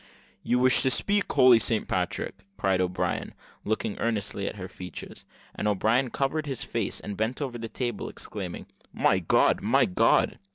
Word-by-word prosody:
"You 125 - +1
wish 130 0 +4
to 130 - +3
speak 200 +10 +1
holy 130 -4 +7
Saint 110 +1 0
Patrick!" - - -2 0.2
cried 95 -1 +1
O'Brien, 90 0 -2 0.3
looking 110 -1 -2
earnestly 105 -3 -1
at - - -4
her 95 -2 -6
features; 90 -3 -9 0.3
and - - -2
O'Brien 110 +5 +2
covered 145 +5 -1
his 135 -4 -4
face, 115 -4 -2
and 105 - -6
bent 110 +5 -2
over 130 -5 -4
the 115 0 -5
table, 120 -3 -3
exclaiming, - - -6 0.3
"My - - +2
God, - - +3
my - - +3
God!" 90 - +2
115 Hz, 165 wpm, -27 LUFS, 100-130 Hz, 0.3 s, holy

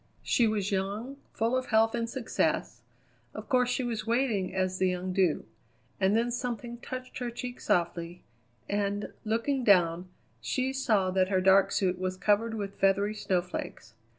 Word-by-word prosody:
She 235 - +3
was 210 -2 -1
young, 205 +8 -2
full 230 +3 0
of 255 0 -1
health 225 0 +3
and 230 -1 -2
success. 245 -1 -1 0.5
Of - - -7
course 250 -1 +2
she 250 +1 0
was 225 -3 -3
waiting 230 -6 +1
as 185 0 -1
the 185 - +3
young 180 0 -3
do. 180 -4 +1 0.5
And 195 +1 +3
then 235 +1 +1
something 240 -1 -4
touched 255 +1 -7
her 245 -1 -2
cheek 245 +1 -7
softly, 170 0 -1 0.4
and, 205 0 -2
looking 235 +5 0
down, 180 -4 +3 0.3
she 260 0 -1
saw 215 -9 +1
that 185 0 +2
her 190 -2 +2
dark 190 +1 +5
suit 185 -2 0
was 185 0 -2
covered 215 +3 +1
with 200 -2 -5
feathery 200 +2 +2
snowflakes. 180 -4 -3
205 Hz, 160 wpm, -29 LUFS, 185-240 Hz, 0.5 s, dark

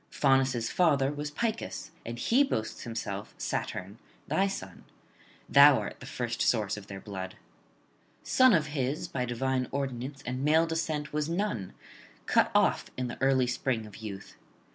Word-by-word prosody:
Faunus' 135 -4 +2
father 145 -6 +3
was 150 0 -4
Picus; 225 +8 -3
and 115 +1 -6
he 240 - +3
boasts 110 - -3
himself, 105 -4 -5
Saturn, 100 +4 -4 0.3
thy 195 - +2
son; 95 - -7 0.6
thou 140 -1 +8
art - - -5
the 125 - -10
first 120 -3 -3
source 105 -3 +2
of 105 -1 -10
their 100 0 -7
blood. 95 -2 -6 0.9
Son 255 -1 +5
of 155 -2 +2
his, 135 +1 -1
by 125 -2 -2
divine 130 +1 -1
ordinance, 135 0 -4
and 130 +2 -3
male 160 +3 +4
descent 160 -3 -2
was 150 +1 -1
none, 170 - -2 0.5
cut - - +3
off - - +3
in 125 -1 -2
the - - -8
early 135 -1 +4
spring 125 -2 -1
of 105 -2 -11
youth. 100 -3 -8
130 Hz, 155 wpm, -29 LUFS, 115-150 Hz, 0.9 s, thou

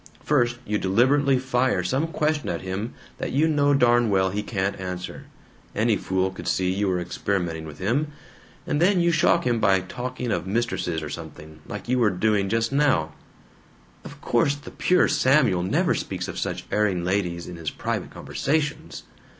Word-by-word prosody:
First 120 -5 +2
you 105 0 -1
deliberately 130 +8 +3
fire 125 -6 +1
some 135 - 0
question 155 -2 -1
at 85 - -3
him 95 +5 -4 0.2
that - - -3
you 150 +4 +3
know 145 -2 +3
darn 120 -3 +4
well 95 -1 +2
he 105 +2 -2
can't 100 -2 -2
answer 90 -1 -6 0.5
any 110 +1 +2
fool 95 -1 -1
could 95 - -9
see 95 0 +1
you 100 +1 0
were 90 -1 +1
experimenting 85 -2 -2
with 75 -1 -10
him 120 - 0 0.6
and 145 - -1
then 185 +1 +4
you 170 0 +3
shock 170 +1 +3
him 120 -2 +1
by 95 -3 +4
talking 125 +4 -5
of - - -2
mistresses 95 -7 -1
or 75 - -5
something, 75 +1 -9
like 105 - -7
you 125 +1 +1
were 115 -3 +4
doing 100 +1 +1
just 115 +2 0
now 135 - +2 0.5
" - - -30
"Of - - -11
course 140 +4 +2
the 145 - -11
pure 180 - +3
Samuel 130 -9 +3
never 90 - +1
speaks - - -4
of - - -5
such - - -3
erring 100 -4 +1
ladies 90 -2 -1
in 90 - -7
his 80 -3 -4
private - - -3
conversations!" 150 +1 -2
105 Hz, 180 wpm, -24 LUFS, 95-135 Hz, 0.6 s, darn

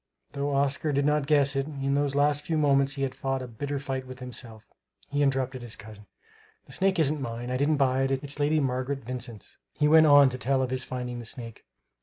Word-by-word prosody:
Though 140 0 -2
Oscar 140 +2 +1
did 140 0 +1
not 150 -1 +1
guess 140 -2 +3
it, 135 +1 -1
in 140 -2 -2
those 140 -1 0
last 145 0 +2
few 160 - -1
moments 140 -2 +3
he 135 - -2
had 130 -1 -1
fought; 135 0 -2
a - - -6
bitter 140 +5 -4
fight 135 -1 -4
with 130 0 -9
himself. 120 -3 -7 0.5
He 145 0 0
interrupted 135 -2 0
his 120 -2 -5
cousin: 105 -1 -13 0.6
"The - - -16
snake 190 0 +1
isn't 150 -2 +1
mine. 120 0 -5
I 130 - 0
didn't 145 +3 +2
buy 135 -1 +2
it. 135 - +1
It's 140 +2 -3
Lady 150 +2 +2
Margaret 135 0 -2
Vincent's." 120 -3 -7 0.2
He 150 - +2
went 160 +1 +7
on 145 -2 +7
to 130 0 -6
tell 135 +1 +1
of 130 - -3
his 130 0 -1
finding 125 -1 -5
the 120 - -8
snake. 115 0 -6
135 Hz, 225 wpm, -27 LUFS, 125-145 Hz, 0.6 s, went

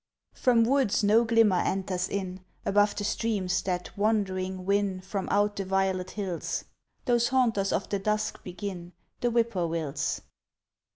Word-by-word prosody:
From 240 -3 +3
woods 255 -4 +2
no 215 +3 +5
glimmer 225 -4 +4
enters 185 -1 -1
in, 185 -2 -4 0.2
Above 205 +1 +3
the 205 - -3
streams 200 -4 0
that 180 -1 -3
wandering 190 -3 0
win 200 -1 +1
From 190 0 -4
out 205 +1 +2
the 195 - -1
violet 190 -1 0
hills, 190 -5 -3 0.4
Those 240 -1 +3
haunters 230 -7 +2
of 200 - -1
the 200 - 0
dusk 210 +2 -1
begin, 180 -1 -6 0.3
The 245 - +1
whippoorwills. 170 -11 -1
200 Hz, 135 wpm, -28 LUFS, 185-215 Hz, 0.4 s, no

